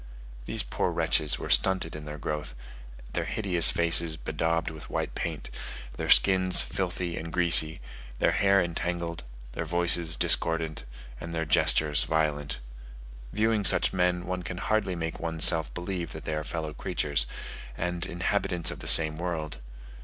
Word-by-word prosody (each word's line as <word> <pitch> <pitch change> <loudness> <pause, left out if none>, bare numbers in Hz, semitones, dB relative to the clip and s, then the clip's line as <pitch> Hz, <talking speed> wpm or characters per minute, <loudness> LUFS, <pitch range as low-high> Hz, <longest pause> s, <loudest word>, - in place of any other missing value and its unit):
These - - -2
poor - - -2
wretches 75 -2 0
were - - -6
stunted 95 -4 +2
in 75 -1 -8
their 75 0 -8
growth, 75 -3 -5 0.6
their - - -2
hideous 90 -6 +2
faces 85 -1 +2
bedaubed 80 0 -2
with 80 -1 -11
white - - -4
paint, - - -5 0.4
their - - -5
skins 95 -1 +4
filthy 90 -2 -4
and 85 +1 -8
greasy, 85 -4 +5 0.4
their - - +1
hair 100 0 +2
entangled, 85 -3 -3 0.3
their - - -5
voices 85 -2 +1
discordant, 80 -2 +1 0.3
and 85 0 -7
their 80 0 -2
gestures 75 0 +2
violent. 75 -3 -1 0.7
Viewing 110 0 0
such - - +3
men, 90 -1 0
one 90 0 -4
can 90 +1 -7
hardly 100 -1 -1
make 80 -1 -5
one's 80 -2 +3
self 80 -4 +5
believe 90 -1 -5
that 80 - -10
they 80 - -3
are 75 0 -3
fellow 80 -1 -5
creatures, 75 -7 -1 0.5
and 90 0 -3
inhabitants 90 -1 -2
of - - -9
the - - -9
same 80 -1 +8
world. 80 -5 -5
85 Hz, 155 wpm, -27 LUFS, 80-90 Hz, 0.7 s, same